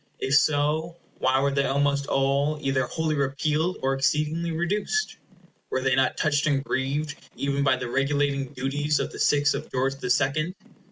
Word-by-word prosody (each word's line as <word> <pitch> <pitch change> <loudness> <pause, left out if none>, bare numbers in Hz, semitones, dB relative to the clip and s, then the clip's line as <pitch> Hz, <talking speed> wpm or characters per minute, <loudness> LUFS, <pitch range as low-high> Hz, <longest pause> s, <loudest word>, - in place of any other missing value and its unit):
If 135 - -2
so, 155 +3 +2 0.2
why 130 +1 +2
were 140 0 +2
they 140 0 +1
almost 140 0 +1
all 140 +2 +1
either 135 -2 0
wholly 160 +2 -1
repealed, 150 +5 0
or 135 0 +2
exceedingly 150 +5 0
reduced? 205 - -1 0.5
Were 130 - -1
they 130 -1 +2
not 135 -1 +1
touched 155 -1 +1
and 140 -2 +1
grieved 140 +3 -2 0.2
even 140 0 -1
by 135 -2 +4
the 130 -1 -5
regulating 140 +1 0
duties 145 +3 -1
of - - -2
the - - -9
sixth 145 0 +3
of - - -6
George 130 +1 0
the 125 - -5
Second? 145 +7 +1
140 Hz, 170 wpm, -25 LUFS, 135-155 Hz, 0.5 s, by